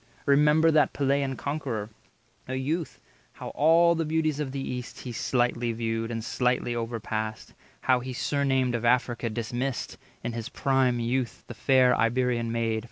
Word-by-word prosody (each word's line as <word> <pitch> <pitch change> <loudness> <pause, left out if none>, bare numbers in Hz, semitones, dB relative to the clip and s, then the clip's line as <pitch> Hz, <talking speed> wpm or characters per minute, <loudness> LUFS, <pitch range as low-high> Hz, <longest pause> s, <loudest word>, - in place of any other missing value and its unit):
Remember 150 +3 +5
that 155 -1 +3
Pellean 140 -1 0
conqueror, 130 -8 -3 0.6
A 130 - -3
youth, 155 +5 -2 0.3
how - - -7
all 165 +3 +4
the 165 -1 -1
beauties 155 -1 0
of 145 -3 -2
the 135 - -4
East 125 -2 -5
He 125 - -6
slightly 120 0 0
viewed, 115 0 -2
and 115 -1 -4
slightly 125 0 0
overpassed; 110 -2 -4 0.3
How 130 -1 +3
he 130 +1 -6
surnamed 130 -1 0
of 120 -1 -2
Africa 120 -1 +1
dismissed, 120 +4 -3 0.2
In 120 0 -3
his 115 -1 -5
prime 130 -3 +1
youth, 120 0 -2
the - - -8
fair 130 -2 +4
Iberian 120 0 +1
maid. 115 -1 0
125 Hz, 155 wpm, -27 LUFS, 115-140 Hz, 0.6 s, Remember